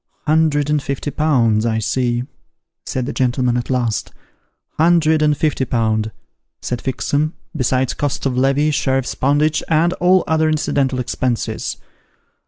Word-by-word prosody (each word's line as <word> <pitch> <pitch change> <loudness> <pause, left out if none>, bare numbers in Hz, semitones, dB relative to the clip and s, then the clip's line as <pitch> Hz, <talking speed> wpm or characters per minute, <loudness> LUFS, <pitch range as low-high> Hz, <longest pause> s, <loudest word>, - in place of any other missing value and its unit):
' - - -44
Hundred 150 -2 +2
and 150 -1 +2
fifty 140 +1 -4
pounds, 120 -9 +2
I 115 -1 0
see,' 120 +2 0 0.6
said 130 -1 -2
the - - -4
gentleman 125 -1 +1
at 120 -1 -2
last. 120 -4 -1 0.3
' - - -48
Hundred 160 -1 +4
and 150 -1 +2
fifty 150 -3 0
pound,' 110 -3 0 0.5
said 120 -1 -4
Fixem, 145 +4 -1
' - - -30
besides 130 -2 0
cost 145 -2 -3
of 130 -2 0
levy, 135 +4 +2
sheriff's 135 -2 0
poundage, 150 +3 +1
and 165 +2 +2
all 185 0 +3
other 160 0 +2
incidental 140 -4 0
expenses.' 125 -1 -2
135 Hz, 150 wpm, -19 LUFS, 125-155 Hz, 0.6 s, Hundred